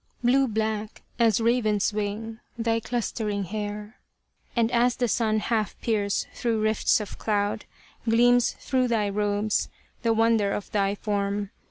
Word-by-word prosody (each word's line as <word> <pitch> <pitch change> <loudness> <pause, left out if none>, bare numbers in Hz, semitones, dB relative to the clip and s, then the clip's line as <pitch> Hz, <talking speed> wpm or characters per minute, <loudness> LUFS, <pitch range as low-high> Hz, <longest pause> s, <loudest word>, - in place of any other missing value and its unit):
Blue 265 +3 +4
black, 220 -1 -3 0.2
as 225 -3 +4
raven's 225 -3 +2
wing, 215 +2 -3 0.2
thy 230 -1 +1
clustering 220 -3 -2
hair: 210 +2 -5 0.6
And 230 -1 +2
as 240 +1 +3
the 245 - 0
sun 220 -1 +1
half 215 -1 -1
peers 205 -3 0
through 230 -2 -1
rifts 215 +1 +3
of 210 - -7
cloud, 205 -1 -1 0.4
Gleams 245 +1 +4
through 255 -1 +1
thy 220 -4 +1
robes 205 +1 0 0.3
the 230 - +2
wonder 225 -2 +3
of 205 - -5
thy 200 -1 +1
form. 200 -1 -2
220 Hz, 140 wpm, -26 LUFS, 205-230 Hz, 0.6 s, Blue